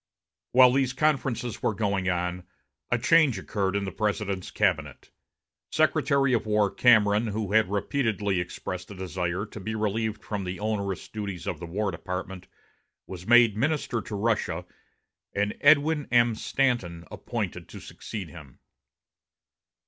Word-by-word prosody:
While 125 0 +8
these 135 -1 +1
conferences 130 -5 0
were 110 - 0
going 100 -2 0
on, 90 0 -2 0.4
a 125 - +2
change 150 -2 +4
occurred 95 0 -2
in 100 - 0
the 95 - -4
President's 100 -2 -2
cabinet; 80 - -1 0.6
Secretary 140 -2 +2
of 115 -2 0
War 105 -1 +2
Cameron, 110 -2 +4
who 105 -1 -3
had 110 -3 +3
repeatedly 100 -2 0
expressed 90 +1 -5
a 100 - -9
desire 90 0 -3
to 105 - -10
be 110 +3 -4
relieved 110 +1 -2
from 105 -2 -4
the 90 0 -5
onerous 100 -3 -2
duties 100 -5 -6
of - - -3
the 85 - -7
War 100 +4 -1
Department, 90 +1 -6 0.6
was 90 -1 -9
made 120 -3 +6
minister 130 -1 -1
to 105 - -7
Russia 110 +2 -1 0.7
and 105 +1 0
Edwin 150 0 +4
M. 120 -1 +4
Stanton 110 -9 -1
appointed - - -5
to - - -9
succeed 100 -6 -7
him. 75 -6 -13
105 Hz, 140 wpm, -27 LUFS, 95-120 Hz, 0.7 s, While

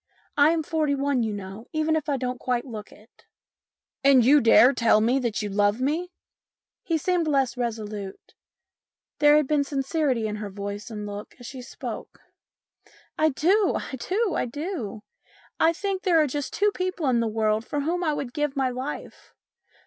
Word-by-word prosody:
I 290 +1 +6
am 325 -1 +1
forty 305 -2 0
one, 275 -2 0
you 220 -2 -1
know, 200 +2 -7
even 310 0 +1
if 305 -2 -2
I 280 - +1
don't 250 -1 -3
quite 245 0 -1
look 215 -5 -8
it." 215 +3 -21 0.4
" - - -65
And 270 -4 +6
you 290 +3 +6
dare 230 +2 +7
to - - 0
tell 230 -4 +4
me 240 +5 +2
that 235 -4 -2
you 205 - -3
love 205 +2 +2
me? 315 +7 -1 0.4
" - - -69 0.3
He 330 - 0
seemed 345 +1 0
less 270 -5 +1
resolute; 215 -5 -5 0.9
there 295 0 +6
had 300 - +3
been 295 -1 +2
sincerity 275 -3 -1
in 210 0 -3
her 210 -1 -5
voice 200 +2 -6
and 210 -2 -6
look 205 0 -8
as 245 - -11
she 260 +1 -8
spoke. 245 - -8 0.5
" - - -29
I 315 0 +4
do! 365 +8 +2
I - - -6
do! 385 - -1
I - - -1
do! 255 - -5 0.6
I 325 - +5
think 385 +2 -3
there 355 -4 +3
are 310 - +4
just 290 0 -3
two 415 +1 +2
people 370 -5 -2
in 245 -2 +3
the 230 - +1
world 215 0 0
for 290 +4 -3
whom 345 +5 -1
I 310 -3 +1
would 250 -4 -5
give 295 -1 -1
my 265 -2 +1
life. 260 +4 -7
270 Hz, 195 wpm, -25 LUFS, 225-310 Hz, 0.9 s, dare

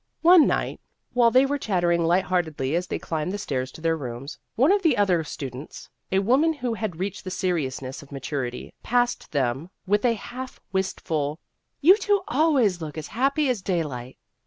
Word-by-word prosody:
One 345 -2 +8
night, - - -1 0.3
while 240 -1 +5
they 255 +3 +5
were 285 +1 -1
chattering 175 -6 +1
light 175 +3 +3
heartedly 160 -7 -1
as 175 +1 -1
they - - -2
climbed 160 +1 -3
the 205 - -3
stairs 130 -9 -3
to - - -11
their 165 0 +2
rooms, 130 -1 -7 0.2
one 270 +9 +4
of 405 0 +3
the 320 -8 +3
other 185 -5 +3
students 135 -1 -8 0.2
a 190 - +2
woman 260 +11 +3
who 250 -5 -3
had 210 -7 -4
reached 200 +1 -3
the 185 - -5
seriousness 140 -8 -2
of 145 - -16
maturity 135 -2 -4
passed 245 +1 0
them 135 +3 -1 0.2
with 205 +2 +2
a 240 -2 +3
half 255 +4 -8
wistful, 160 -6 -1 0.2
" - - -52
You 370 +7 +7
two 410 -1 +2
always 255 - +2
look 155 -1 -6
as 155 - -6
happy 275 +5 +1
as 245 -6 0
daylight." 145 -10 -3
185 Hz, 185 wpm, -25 LUFS, 150-245 Hz, 0.3 s, One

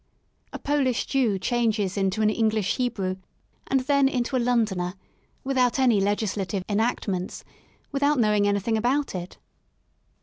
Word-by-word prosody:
A - - -5
Polish 275 -4 0
Jew 245 -8 +1
changes 220 -2 0
into 195 +2 0
an 215 - +4
English 215 -3 0
Hebrew 195 -7 -1 0.5
and 270 -1 +2
then 280 0 +3
into 255 0 -1
a - - +3
Londoner 210 -7 0 0.5
without 255 -2 +1
any 245 -6 +3
legislative 200 -1 -1
enactments, 205 -4 -1 0.5
without 285 +1 +2
knowing 210 -3 +3
anything 205 +2 +1
about 265 +6 0
it. 180 -1 -6
220 Hz, 130 wpm, -25 LUFS, 200-255 Hz, 0.5 s, an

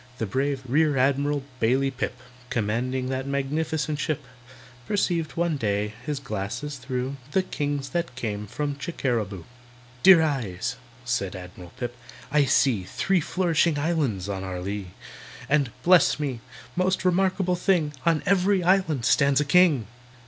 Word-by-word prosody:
The 110 - -1
brave 135 +5 -1
REAR 150 +2 +2
ADMIRAL 140 +2 +1 0.2
BAILEY 130 +4 +2
PIP, 125 -1 -4 0.3
Commanding 125 +4 -1
that 130 +1 -3
magnificent 150 +2 -1
ship, 150 -1 -2 0.6
Perceived 175 -6 0
one 170 -2 0
day, 105 -3 -1
his 145 +1 -2
glasses 125 +4 -4
through, 130 +1 -3 0.2
The 190 - +3
kings 145 -5 -3
that 170 -3 -2
came 105 -4 -4
from 145 +5 -3
Chickeraboo. 120 - -2 0.6
"Dear 180 -1 +8
eyes!" 120 - -2 0.3
said 100 -6 -1
ADMIRAL 90 -1 -10
PIP, 120 -1 -4 0.4
"I 150 0 +4
see 130 -6 +3
Three 175 - 0
flourishing 170 -1 +1
islands 145 - 0
on 95 -2 -3
our 95 -1 -4
lee. 100 +1 -4 0.6
And, 140 -3 +2
bless 175 -4 +5
me! 135 -5 -2 0.4
most 185 +1 +1
remarkable 185 0 +2
thing! 175 -5 +1
On 165 -2 +2
every 195 0 +3
island 170 -8 +2
stands 140 0 +4
a 150 - +1
king! 155 -6 +4
140 Hz, 140 wpm, -25 LUFS, 120-160 Hz, 0.6 s, Dear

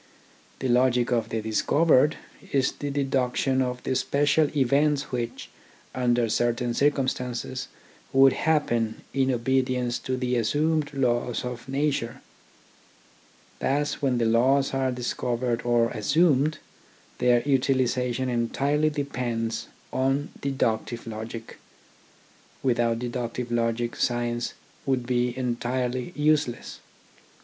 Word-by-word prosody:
The 130 - -2
logic 125 0 +3
of 115 -2 +1
the 110 -1 -2
discovered 145 +6 +3 0.3
is 135 -2 +2
the 145 - -5
deduction 135 -1 0
of 125 -1 -2
the 130 - -1
special 145 +3 +2
events 140 +2 +2
which, 120 -2 -4 0.4
under 120 -2 +2
certain 120 +2 0
circum 140 0 +2
stances, 125 0 -3 0.4
would 135 0 +6
happen 120 -8 0
in 135 -1 +2
obedience 125 0 0
to 130 -1 -3
the 125 -1 0
assumed 150 +7 +1
laws 125 -3 0
of 125 +1 -6
nature. 135 -4 -1 1.4
Thus 145 +2 0
when 130 -3 +1
the 120 - +1
laws 130 +5 +3
are 135 -1 +1
dis 125 -1 -3
covered 120 -1 -1
or 120 -1 +2
assumed, 145 - +2 0.6
their 120 -1 +3
utilisation 130 -2 +1
entirely 140 +5 +1
depends 120 -6 -3 0.3
on 135 +2 0
deductive 120 -4 -1
logic. 115 +1 -7 1.0
Without 120 -3 +2
deductive 120 0 -4
logic 120 0 0
science 120 -1 -1 0.3
would 130 -2 +1
be 125 0 0
entirely 125 +2 -2
useless. 150 -4 0
125 Hz, 110 wpm, -26 LUFS, 120-135 Hz, 1.4 s, would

